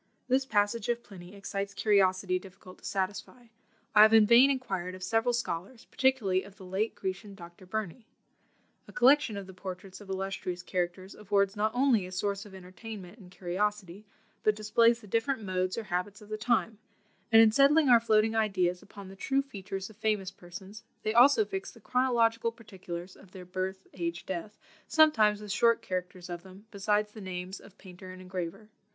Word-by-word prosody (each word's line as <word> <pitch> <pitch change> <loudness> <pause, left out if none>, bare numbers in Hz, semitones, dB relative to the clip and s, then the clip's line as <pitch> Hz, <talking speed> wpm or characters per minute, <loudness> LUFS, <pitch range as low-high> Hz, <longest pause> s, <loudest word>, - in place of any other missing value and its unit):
This 260 +1 +2
passage 205 +1 +1
of 240 0 -1
Pliny 185 -1 -12
excites 200 0 -5
curiosity 185 -2 +2
difficult 185 -1 -14
to - - -26
satisfy; 200 +5 -4 0.4
I 210 - +7
have 220 +1 +8
in 220 -1 +7
vain 240 +5 +7
inquired 190 -9 -2
of 185 - -9
several 225 +6 +1
scholars, 230 -1 -4
particularly 235 -9 +1
of 195 0 -14
the 190 - -12
late 195 +5 -2
Grecian, 195 +1 -5
Dr. 175 0 -13
Burney. 220 +3 -5 0.8
A - - -12
collection 260 -3 +4
of 200 - -6
the 190 - -12
portraits 185 +1 -8
of 200 - -13
illustrious 190 -2 -4
characters 185 +1 -3
affords 200 -1 0
not 215 +1 +1
only 245 -7 +3
a - - -11
source 200 +2 -2
of 195 - -13
entertainment 190 +2 -10
and 185 -3 -14
curiosity, 190 +1 -3 0.4
but 215 - +2
displays 230 +2 +3
the - - -13
different 225 +4 -1
modes 185 0 -1
or 230 - -3
habits 190 +1 -3
of 210 - -15
the 215 - -3
time; 220 -1 0 0.5
and 225 - +8
in 225 -1 +7
settling 285 +5 +5
our 240 -2 +7
floating 220 -1 +2
ideas 185 -5 +1
upon 200 -1 -12
the 190 - -11
true 275 +7 0
features 195 -6 -6
of 210 - -19
famous 210 -4 -1
persons, 190 +4 -11 0.2
they 215 - 0
also 280 - +6
fix 385 -1 -5
the 230 - -16
chronological 230 -1 +1
particulars 185 -6 -9
of 190 -2 -18
their 185 -2 -9
birth, 190 +1 -4
age, 170 -1 -4
death, 190 +3 -5 0.3
sometimes 220 -10 +4
with 210 -1 -6
short 230 +3 +3
characters 180 0 -5
of 175 -1 -6
them, 190 +3 -15
besides 210 +1 0
the 215 - -11
names 185 0 -6
of 200 - -17
painter 185 0 -12
and 185 0 -10
engraver. 185 +2 -6
200 Hz, 180 wpm, -29 LUFS, 185-225 Hz, 0.8 s, have